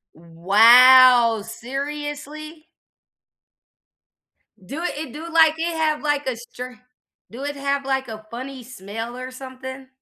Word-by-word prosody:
Wow. 230 +7 +5
Seriously? 295 +5 -7 2.0
Do 285 - -7
it 355 - -4
it 295 -5 -7
do, 320 +3 -8
like, 320 -1 +4
it 335 +1 -3
have, 310 -1 -1
like, 290 -2 -1
a 260 - -1
stra 250 +1 -10 0.5
do 245 +5 -9
it 290 0 -4
have, 280 0 -2
like, 265 -1 -2
a 215 -1 -10
funny 260 +2 -8
smell 225 +1 -8
or 255 0 -7
something? 260 0 -10
260 Hz, 125 wpm, -21 LUFS, 240-295 Hz, 2.0 s, Wow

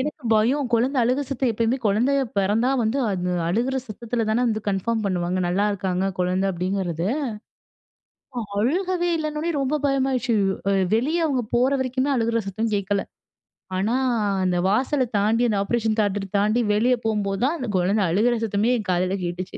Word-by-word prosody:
எனக்கு 300 +2 -4
பயம். 250 +6 +2
குழந்தை 255 +5 +1
அழுக 255 +4 +1
சத்தம். 260 -2 0
எப்பயுமே 230 +4 0
குழந்தை 230 +7 +2 0.2
பிறந்தா 210 +6 +2
வந்து, 225 +5 0
அது 180 -1 -1 0.2
அழுற 245 +8 0
சத்தத்தில 230 +1 -3
தான 235 +3 +2
வந்து 220 -2 -1
கன்ஃபார்ம் 220 +3 -1
பண்ணுவாங்க, 180 -1 -1
"நல்லா 195 +4 +1
இருக்காங்க 190 -1 -1
குழந்தை." 185 +2 +1
அப்டிங்கிறது. 180 -1 -2 1.5
அழுகவே 350 - 0
இல்லன்னொனே 305 +1 -2
ரொம்ப 270 +3 0
பயமாகிருச்சு. 265 -3 +1 0.3
அ - - +3 0.2
வெளிய 315 +9 +1
அவங்க 265 -4 0
போற 250 +3 +3
வரைக்குமே 260 +1 -1
அழுற 230 -1 +1
சத்தம் 220 +3 -2
கேட்கல. 200 0 0 0.7
ஆனா, 200 +5 0 0.5
அந்த 180 -1 +1
வாசல 260 +6 +1
தாண்டி, 220 +4 +2
அந்த 210 - 0
ஆப்பரேஷன் 220 0 0
தியேட்டர் 205 -1 0
தாண்டி, 210 +4 +2
வெளியே 240 +5 +3
போகும்போது 205 -3 -1
தான் 285 +6 +2
அந்த 255 -5 -4
குழந்தை 190 +4 +2
அழுற 220 +8 +2
சத்தமே 220 +2 +1
என் 210 -3 -6
காதுல 185 +1 +1
கேட்டுச்சு. 175 +1 -5
220 Hz, 155 wpm, -23 LUFS, 195-255 Hz, 1.5 s, அ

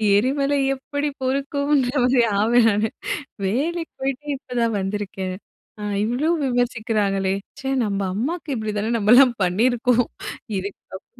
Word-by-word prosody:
எரிமலை 275 +6 +2 0.2
எப்டி 285 +2 -3
பொறுக்கும்ன்ற 280 0 +1
மாரி 250 -1 +4 0.2
ஆவேன் 230 +1 +4
நானு. 210 +2 +1 0.6
"வேலைக்கு 320 - -1
போயிட்டு 270 +2 -2
இப்பதான் 240 -4 -1
வந்திருக்கேன். 195 -1 -3 0.4
அ - - -6 0.2
இவ்ளோ 255 +8 0 0.2
விமர்சிக்கிறாங்களே! 220 -6 0 0.3
ச்சே, 270 - -2
நம்ம 200 -1 -1 0.2
அம்மாவுக்கு 295 - -2
இப்படி 215 -1 -3
தானே 220 +3 -1
நம்மலாம் 240 +3 +6
பண்ணியிருப்கோம்" 245 +5 +2 0.5
இதுக்கப் 190 0 -8
245 Hz, 115 wpm, -22 LUFS, 210-275 Hz, 0.6 s, நம்மலாம்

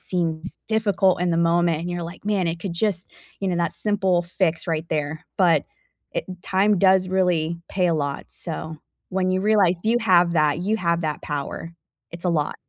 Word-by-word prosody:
seems 170 -2 -2
difficult 205 -4 +2
in 180 - +1
the 165 - +1
moment, 170 -1 +2
and 175 +1 -4
you're 175 0 -3
like, 170 +3 -8
"Man, 200 -3 +1
it 165 0 -2
could 185 +1 -4
just" 185 0 -1 0.3
you 195 - -1
know, 180 - 0
that 170 0 0
simple 190 -4 +1
fix 170 -1 -1
right 160 -1 -1
there, 155 +2 -2
but 170 -6 +4 0.5
it - - -2 0.2
time 195 +1 +2
does 190 0 +4
really 175 -3 +1
pay 185 -2 +1
a 170 - +2
lot, 145 -2 -2
so, 160 -1 -6 0.3
when 185 0 0
you 185 0 +1
realize 205 -4 +4
you 230 +2 +3
have 180 -5 +4
that 155 -1 +2
you 205 +5 0
have 170 -2 0
that 155 -2 -2
power, 150 +3 -4 0.4
it's 170 +1 -8
a 180 - +2
lot. 150 -3 0
175 Hz, 195 wpm, -23 LUFS, 165-190 Hz, 0.5 s, but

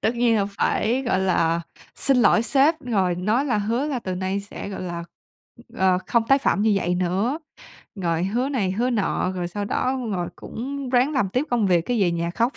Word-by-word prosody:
Tất 230 - +1
nhiên 235 -1 +3
là 200 -2 +1
phải, 225 +5 0
gọi 240 -7 +1
là, 170 -3 +2 0.3
xin 270 -2 +2
lỗi 235 -2 +4
sếp 290 +6 +3
rồi 195 -9 0
nói 215 +9 +1
là 245 -7 +1
hứa 230 +7 0
là 280 -4 -2
từ 185 -5 -4
nay 190 +2 -2
sẽ, 200 0 -8
gọi 195 - -6
là, 170 -1 -5 0.7
ờ, 185 -1 +3
không 235 - +2
tái 275 +1 +6
phạm 210 - +1
như 220 - +3
vậy 180 -2 0
nữa, 190 - 0 0.6
rồi 170 -3 -1
hứa 240 +8 0
này 205 -10 0
hứa 235 +6 0
nọ, 205 -5 0
rồi 180 -2 -3
sau 205 +3 -4
đó 255 +5 0
rồi 175 -3 -2
cũng 275 +3 -6
ráng 255 +3 +3
làm 205 -8 +1
tiếp 255 +8 0
công 230 -5 +2
việc 175 -2 +3
cái 240 -4 0
về 175 - +3
nhà 170 0 -1
khóc. 235 +8 0
210 Hz, 215 wpm, -23 LUFS, 185-250 Hz, 0.7 s, tái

